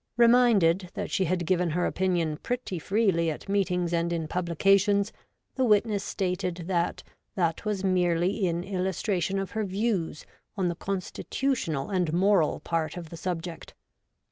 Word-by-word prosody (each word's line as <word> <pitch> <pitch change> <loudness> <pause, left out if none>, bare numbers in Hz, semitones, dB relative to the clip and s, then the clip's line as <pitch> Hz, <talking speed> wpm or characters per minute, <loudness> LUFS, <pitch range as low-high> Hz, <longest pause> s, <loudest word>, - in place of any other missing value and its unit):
' - - -54
Reminded 225 -8 +4
that - - -4
she 190 - +1
had 175 0 -1
given 180 0 +1
her 175 +3 0
opinion 175 -5 0
pretty 245 -4 -3
freely 190 -3 +1
at 155 - -6
meetings 180 -3 0
and 170 0 +1
in 165 -2 -2
publications, 195 +5 +2 0.4
the 260 - 0
witness 210 -3 +2
stated 180 -3 -2
that 175 -1 -1 0.3
that 170 -1 0
was 205 -2 -1
merely 180 +1 +1
in 170 0 -1
illus 190 -1 -2
tration 195 -2 0
of 195 - -4
her 220 -1 -1
views 195 -5 -2 0.3
on 185 -2 +1
the 170 - -2
constitutional 190 - -2
and 180 -5 0
moral 185 -2 +3
part 165 0 -2
of 170 -3 -8
the - - -6
subject. 170 -1 -5
185 Hz, 155 wpm, -27 LUFS, 170-200 Hz, 0.4 s, Reminded